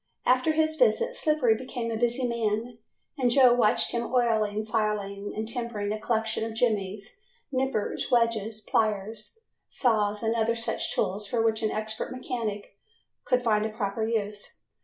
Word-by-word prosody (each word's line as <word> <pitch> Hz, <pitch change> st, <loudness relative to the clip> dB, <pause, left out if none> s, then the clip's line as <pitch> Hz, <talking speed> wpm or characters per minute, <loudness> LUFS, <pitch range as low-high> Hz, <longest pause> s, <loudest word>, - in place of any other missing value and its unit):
After 255 Hz, +5 st, +3 dB
his 315 Hz, 0 st, +1 dB
visit -, -, +2 dB
Slippery 300 Hz, -7 st, +3 dB
became 235 Hz, 0 st, -4 dB
a -, -, -1 dB
busy 240 Hz, +2 st, +1 dB
man 230 Hz, 0 st, -2 dB, 0.4 s
and 250 Hz, -2 st, +3 dB
Joe 250 Hz, 0 st, +6 dB
watched 235 Hz, -3 st, +3 dB
him 235 Hz, 0 st, -2 dB
oiling, 220 Hz, -4 st, +1 dB
filing 210 Hz, -2 st, -2 dB
and 220 Hz, +1 st, -3 dB
tempering 230 Hz, -4 st, -3 dB
a 215 Hz, -, -2 dB
collection 220 Hz, -1 st, -1 dB
of 225 Hz, 0 st, -4 dB
jimmies, 215 Hz, -, -1 dB, 0.3 s
nippers, 260 Hz, -5 st, -1 dB
wedges, 225 Hz, -3 st, +1 dB
pliers, 215 Hz, -, -1 dB, 0.3 s
saws, 210 Hz, -4 st, +1 dB
and 225 Hz, +1 st, +1 dB
other 230 Hz, 0 st, +1 dB
such 230 Hz, 0 st, -2 dB
tools 200 Hz, +2 st, -1 dB
for 225 Hz, +1 st, 0 dB
which 225 Hz, 0 st, +1 dB
an 215 Hz, -, +1 dB
expert 215 Hz, +3 st, -3 dB
mechanic 220 Hz, -6 st, -5 dB, 0.5 s
could 250 Hz, -2 st, +2 dB
find 215 Hz, -3 st, +2 dB
a 220 Hz, -, -1 dB
proper 215 Hz, 0 st, -3 dB
use. 210 Hz, -2 st, -3 dB
225 Hz, 155 wpm, -27 LUFS, 215-245 Hz, 0.5 s, Joe